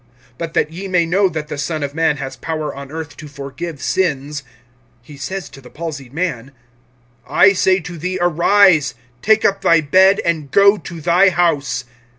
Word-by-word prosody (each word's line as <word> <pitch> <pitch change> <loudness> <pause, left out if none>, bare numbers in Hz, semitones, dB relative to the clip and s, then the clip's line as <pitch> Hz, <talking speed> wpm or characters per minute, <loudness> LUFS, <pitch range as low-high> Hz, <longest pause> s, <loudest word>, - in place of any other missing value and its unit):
(10)But 165 -1 -5
that 150 - 0
ye 185 +4 -7
may 180 -3 +2
know 190 +4 +2
that 155 -2 -5
the 150 - -6
Son 155 +1 -3
of 140 0 -4
man 160 -2 +1
has 135 -1 -6
power 155 +3 -4
on 140 0 -9
earth 155 -2 -7
to 155 - -9
forgive 145 +2 -7
sins, 150 -5 -1 0.6
(he 145 +4 -13
says 175 +6 -5
to 135 - -14
the 125 - -14
palsied 145 -5 -7
man,) 140 -6 -3 0.8
(11)I 195 0 +5
say 185 +1 +3
to 170 0 -8
thee, 185 +3 -3
arise, 175 -2 +3 0.3
take 220 +1 +3
up 195 0 +1
thy 165 - +4
bed, 190 +6 +4
and 160 -4 -1
go 200 +6 +5
to 170 -1 -9
thy 180 +4 +4
house. 145 -8 0
160 Hz, 180 wpm, -18 LUFS, 145-185 Hz, 0.8 s, 11)I